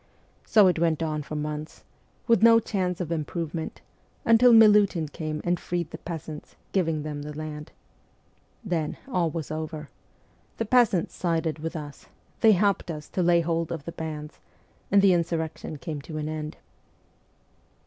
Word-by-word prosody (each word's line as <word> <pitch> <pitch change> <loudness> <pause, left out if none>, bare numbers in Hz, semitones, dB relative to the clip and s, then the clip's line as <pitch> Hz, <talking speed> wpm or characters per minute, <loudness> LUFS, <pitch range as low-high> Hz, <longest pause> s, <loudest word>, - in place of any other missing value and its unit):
So 210 -3 +6
it 180 -3 +3
went 165 -1 +1
on 155 -1 -2
for 155 +1 -7
months, 150 +1 -5 0.4
with 230 -4 +4
no 230 0 +7
chance 185 -5 -2
of 170 -2 -4
improvement, 165 0 -4 0.4
until 230 +2 +6
Milutin 205 -7 +6
came 155 0 -4
and 175 0 0
freed 170 -2 -3
the - - -7
peasants, 160 -2 -7 0.2
giving 165 -5 0
them 150 -1 -5
the 150 0 -7
land. 155 0 -6 0.9
Then 165 -6 -2
all 180 -10 +1
was 160 -1 -5
over. 155 -1 -5 0.7
The 225 - -1
peasants 225 -6 +3
sided 165 -3 -1
with 165 +2 -5
us; 145 -2 -8 0.3
they 220 -1 +6
helped 200 -1 +1
us 150 -2 -6
to 185 - -1
lay 170 -1 +4
hold 165 0 -1
of 160 -4 -5
the 170 - -5
bands, 155 -2 -6 0.5
and 200 0 +5
the 195 -2 +6
insurrection 160 -2 -2
came 150 -1 -5
to 155 +2 -7
an 150 0 -3
end.' 155 0 -5
165 Hz, 160 wpm, -26 LUFS, 155-180 Hz, 0.9 s, no